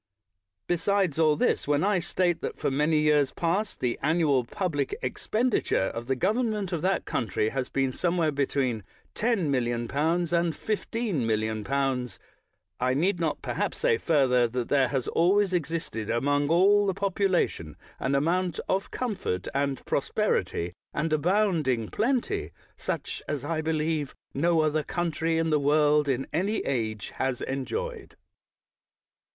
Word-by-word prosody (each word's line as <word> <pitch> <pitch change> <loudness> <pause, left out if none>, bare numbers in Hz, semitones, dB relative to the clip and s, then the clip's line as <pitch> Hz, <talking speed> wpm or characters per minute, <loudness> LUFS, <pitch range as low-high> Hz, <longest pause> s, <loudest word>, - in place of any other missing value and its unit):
Besides 180 -2 +1
all 155 -2 +4
this, 150 - +1
when 145 +1 +2
I 200 -1 +2
state 175 0 0
that, - - -4
for - - -1
many 150 +3 +2
years 150 -2 +3
past, 185 +5 -1
the 120 -2 -1
annual 150 -4 +2
pub 180 +8 -3
lic 145 - -1
expenditure 225 - 0
of 115 +1 -6
the 135 - +1
government 210 - 0
of 165 - -1
that 190 +3 0
coun 115 - -1
try 105 +2 0
has 130 0 -3
been 135 -1 0
somewhere 170 -1 +1
between 135 -5 -1 0.3
10,000,000L 150 - 0
and 170 -1 +2
15,000,000^., 125 - -1 0.6
I 130 +1 +1
need 175 +5 +1
not 160 -3 -1
perhaps - - -2
say 475 -2 +2
further 130 -6 +3
that 120 0 -3
there 135 -2 +3
has 135 -3 -2
always 190 +3 +3
existed 160 - -2
among 145 +4 +1
all 200 +4 +5
the 190 - 0
population 190 - 0 0.2
an 140 - 0
amount 175 +4 +1
of 195 +1 0
comfort 200 - -3
and 140 -1 -1
prosperity 85 +1 0 0.2
and 155 +1 0
abounding 155 - +1
plenty 270 - 0 0.3
such - - -4
as 145 -2 -3
I 160 0 -1
believe 155 -2 -1 0.2
no 165 +3 +2
other 155 0 +1
country 165 0 -1
in 165 0 +1
the 150 - +3
world, 150 0 +3
in 135 0 0
any 195 +7 0
age, 110 -6 -2
has 130 -2 -1
enjoyed. 435 - -4
155 Hz, 140 wpm, -27 LUFS, 135-185 Hz, 0.6 s, all